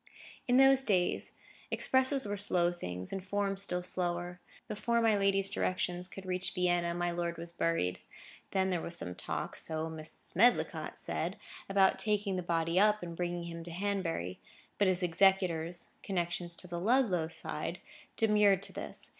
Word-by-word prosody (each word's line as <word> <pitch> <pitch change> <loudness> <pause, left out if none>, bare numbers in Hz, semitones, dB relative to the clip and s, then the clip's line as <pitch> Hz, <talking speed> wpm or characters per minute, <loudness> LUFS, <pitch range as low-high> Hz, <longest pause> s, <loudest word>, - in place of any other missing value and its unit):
In 245 0 +4
those 270 0 +7
days, 185 -9 0 0.4
expresses 265 +1 +4
were 205 0 -2
slow 180 -3 +4
things, 90 - -5
and 195 -1 -4
forms 195 0 0
still 180 -2 +2
slower. 175 0 0 0.3
Before 235 +3 0
my 225 -2 +3
lady's 195 -1 +2
directions 180 -2 -2
could 190 +1 -10
reach 185 0 -3
Vienna, 175 -2 +1
my 175 0 -1
lord 170 0 -3
was 170 0 -7
buried. 165 - -1 0.5
There 190 -3 0
was 170 - -3
some 90 - -4
talk - - -4
(so 160 0 -2
Mrs. 155 +1 -4
Medlicott 240 +7 +2
said) - - -3 0.3
about 195 -1 +3
taking 210 -2 0
the 180 - -2
body 170 0 0
up, 210 -1 +3
and 170 -1 -6
bringing 175 0 -3
him 170 0 -7
to 170 - -7
Hanbury. 170 - -3 0.4
But 200 - +4
his 185 0 +1
executors,—connections 175 -1 0
on 180 - -12
the 170 - -3
Ludlow 200 -6 +2
side,—demurred 195 +5 -1
to - - -7
this. - - -6
180 Hz, 155 wpm, -32 LUFS, 170-200 Hz, 0.5 s, those